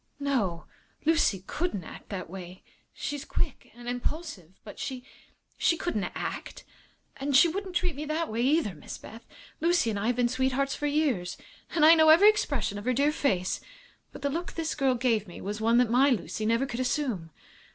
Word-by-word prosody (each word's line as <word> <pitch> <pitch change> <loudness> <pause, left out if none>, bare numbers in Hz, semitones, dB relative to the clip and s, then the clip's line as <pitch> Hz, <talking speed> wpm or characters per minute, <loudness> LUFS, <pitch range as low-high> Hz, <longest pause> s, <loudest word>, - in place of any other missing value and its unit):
"No; 230 -12 -1 0.4
Lucy 310 - +3
couldn't 300 - -2
act - - -11
that 190 -3 -5
way. 185 0 -9 0.3
She's 290 -1 -4
quick - - -3
and 240 0 -11
impulsive, 245 - -4
but 205 - -11
she 255 -2 -4 0.6
she 335 - +3
couldn't 270 - -2
act. - - -5 0.5
And 275 0 -1
she 340 - +7
wouldn't 375 +2 -4
treat 350 -3 0
me 295 +2 -5
that 315 +2 -1
way, 225 +2 -2
either, 275 - +2
Miss 150 - -9
Beth. 225 +2 -12 0.4
Lucy 335 -8 +2
and 205 - -2
I 210 - -1
have 245 - +2
been 245 0 +2
sweethearts 260 +2 0
for 295 - -2
years, 285 - 0 0.3
and 310 -2 +3
I 320 - +10
know 315 -1 +6
every 360 +7 +9
expression 270 - -2
of 205 - -10
her 255 - +2
dear 285 +4 +3
face. 185 -12 0 0.5
But - - -11
the 280 - +1
look 340 +4 -3
that - - -10
this 325 -1 -2
girl 270 -3 +2
gave 230 -4 +1
me 175 - -10
was 210 +2 -4
one 230 +2 +4
that 245 -2 +3
my 265 +4 +5
Lucy 220 -2 -1
never 230 +4 +2
could 245 -2 -5
assume. 250 - -1
255 Hz, 195 wpm, -28 LUFS, 215-305 Hz, 0.6 s, I